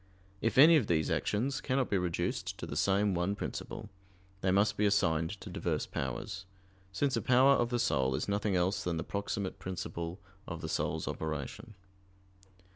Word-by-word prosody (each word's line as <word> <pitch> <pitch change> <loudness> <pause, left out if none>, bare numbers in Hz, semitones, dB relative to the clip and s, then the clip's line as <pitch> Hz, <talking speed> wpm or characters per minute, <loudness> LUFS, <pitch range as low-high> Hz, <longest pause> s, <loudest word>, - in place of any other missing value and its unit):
If 115 - 0
any 160 +4 +9
of 125 - +1
these 80 -3 +1
actions 135 +7 0
cannot 130 -1 0
be 100 - +3
reduced 90 -2 -2
to - - -5
the - - -6
same 100 +5 +2
one 90 +3 0
principle, 105 0 -6 0.5
they 95 - +1
must 100 +3 +3
be 105 - +2
assigned 85 -1 +1
to - - -8
diverse - - -1
powers; 95 - -4 0.4
since 135 +8 0
a - - 0
power 130 +2 +5
of 120 -3 +2
the 120 - 0
soul 65 - +1
is - - -2
nothing 100 -1 0
else 90 +2 +1
than 85 -2 -1
the 80 - -2
proximate 100 -1 -3
principle 90 -1 -5 0.3
of 85 -2 -5
the 80 - -4
soul's - - -1
operation. 80 - -5
95 Hz, 175 wpm, -32 LUFS, 85-110 Hz, 0.5 s, any